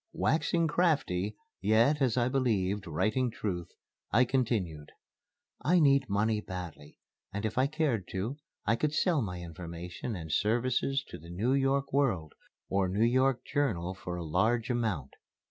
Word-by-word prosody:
Waxing 165 Hz, +1 st, +1 dB
crafty, 125 Hz, -, +1 dB, 0.2 s
yet, 115 Hz, +9 st, +3 dB
as 130 Hz, -3 st, +2 dB
I 120 Hz, -1 st, +3 dB
believed, 105 Hz, -7 st, 0 dB
writing 110 Hz, +11 st, +1 dB
truth, 90 Hz, -6 st, -4 dB, 0.4 s
I 125 Hz, +4 st, +5 dB
continued: 110 Hz, -, -1 dB, 0.7 s
"I 180 Hz, +3 st, +4 dB
need 140 Hz, -4 st, +4 dB
money 105 Hz, +2 st, +1 dB
badly, 90 Hz, -7 st, -8 dB, 0.3 s
and 100 Hz, +2 st, -3 dB
if 110 Hz, -, -2 dB
I 130 Hz, +2 st, +3 dB
cared 145 Hz, -, 0 dB
to, 110 Hz, +9 st, -2 dB, 0.3 s
I 115 Hz, -, +3 dB
could 150 Hz, +3 st, 0 dB
sell 165 Hz, -5 st, +2 dB
my 90 Hz, -5 st, -4 dB
information 85 Hz, +5 st, -6 dB
and 80 Hz, -4 st, -6 dB
services 125 Hz, -, +1 dB
to -, -, -8 dB
the 85 Hz, +2 st, -13 dB
New 105 Hz, +9 st, 0 dB
York 135 Hz, 0 st, +1 dB
World 105 Hz, -, +1 dB, 0.3 s
or 95 Hz, -1 st, +1 dB
New 105 Hz, +5 st, +2 dB
York 130 Hz, +1 st, +2 dB
Journal 100 Hz, -, 0 dB
for 90 Hz, -2 st, -6 dB
a 85 Hz, -1 st, -4 dB
large 110 Hz, +9 st, +1 dB
amount. 105 Hz, -, -1 dB
110 Hz, 150 wpm, -30 LUFS, 90-135 Hz, 0.7 s, I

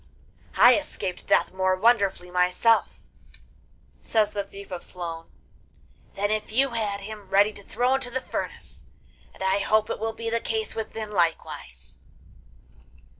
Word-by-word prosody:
'I 245 Hz, +3 st, +8 dB
escaped 240 Hz, -11 st, -5 dB
death -, -, +3 dB
more 185 Hz, 0 st, +2 dB
wonderfully 200 Hz, -4 st, +2 dB
myself,' 180 Hz, +6 st, +2 dB, 1.0 s
says 215 Hz, -2 st, +1 dB
the 200 Hz, -, -1 dB
Thief 200 Hz, 0 st, -12 dB
of 180 Hz, -1 st, -5 dB
Sloan, 165 Hz, -2 st, -6 dB, 0.9 s
'than 205 Hz, +1 st, 0 dB
if 215 Hz, 0 st, -2 dB
you 270 Hz, +5 st, +3 dB
had 210 Hz, -4 st, -2 dB
him 210 Hz, -1 st, -9 dB
ready 205 Hz, +2 st, +4 dB
to 205 Hz, -, -12 dB
throw 245 Hz, +6 st, 0 dB
into 265 Hz, -2 st, -1 dB
the 255 Hz, +2 st, -2 dB
furnace, 255 Hz, -, -6 dB, 0.5 s
and -, -, -8 dB
I 190 Hz, +1 st, +2 dB
hope 215 Hz, +2 st, +2 dB
it -, -, -3 dB
will 225 Hz, +1 st, -2 dB
be 230 Hz, 0 st, -4 dB
the 230 Hz, -, +1 dB
case 220 Hz, -1 st, -2 dB
with 225 Hz, -, -5 dB
him 215 Hz, -1 st, -5 dB
likewise. 165 Hz, -, -2 dB
210 Hz, 150 wpm, -26 LUFS, 190-225 Hz, 1.0 s, I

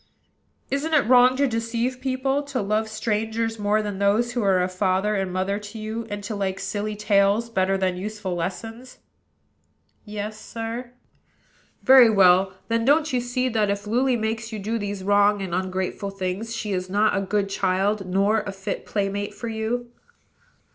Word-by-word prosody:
"Isn't 300 Hz, +4 st, 0 dB
it 290 Hz, -, +4 dB
wrong 250 Hz, +1 st, +6 dB
to 280 Hz, -, +3 dB
deceive 235 Hz, +1 st, -2 dB
people, 270 Hz, +1 st, 0 dB
to 280 Hz, -2 st, -4 dB
love 215 Hz, +2 st, 0 dB
strangers 225 Hz, +1 st, -2 dB
more 210 Hz, +1 st, +1 dB
than 205 Hz, -2 st, -4 dB
those 210 Hz, +4 st, +2 dB
who 240 Hz, 0 st, -1 dB
are 190 Hz, -3 st, +3 dB
a -, -, +1 dB
father 190 Hz, +2 st, 0 dB
and 195 Hz, -2 st, -1 dB
mother 190 Hz, +2 st, -1 dB
to 210 Hz, +2 st, -9 dB
you, 220 Hz, +1 st, -5 dB
and 205 Hz, 0 st, -5 dB
to 210 Hz, +1 st, -4 dB
like 195 Hz, -1 st, -2 dB
silly 205 Hz, +2 st, -3 dB
tales 210 Hz, +2 st, +2 dB
better 195 Hz, -2 st, +1 dB
than 185 Hz, -1 st, 0 dB
useful 205 Hz, -1 st, -4 dB
lessons?" 225 Hz, +8 st, -5 dB, 1.1 s
"Yes, 210 Hz, 0 st, -6 dB
sir." 230 Hz, +3 st, -6 dB, 0.9 s
"Very 260 Hz, -3 st, +8 dB
well. 190 Hz, -2 st, +5 dB
Then, 230 Hz, 0 st, 0 dB
don't 295 Hz, +3 st, +3 dB
you 250 Hz, -, +2 dB
see, 245 Hz, +1 st, -1 dB
that, 215 Hz, -3 st, +1 dB
if 200 Hz, +1 st, -2 dB
Luly 250 Hz, +4 st, +2 dB
makes 220 Hz, 0 st, -3 dB
you 220 Hz, -, -4 dB
do 220 Hz, +3 st, -2 dB
these 205 Hz, -2 st, -4 dB
wrong 205 Hz, +1 st, +3 dB
and 190 Hz, -3 st, -4 dB
ungrateful 185 Hz, +2 st, -2 dB
things, 195 Hz, +4 st, -4 dB
she 210 Hz, -2 st, -3 dB
is 185 Hz, 0 st, -3 dB
not 210 Hz, +2 st, +2 dB
a 195 Hz, -, +1 dB
good 200 Hz, +1 st, 0 dB
child, 195 Hz, +1 st, 0 dB
nor 200 Hz, +4 st, +2 dB
a 200 Hz, -, -5 dB
fit 195 Hz, 0 st, -5 dB
playmate 200 Hz, 0 st, -2 dB
for 235 Hz, -, -5 dB
you?" 230 Hz, +2 st, -3 dB
210 Hz, 175 wpm, -24 LUFS, 195-230 Hz, 1.1 s, Very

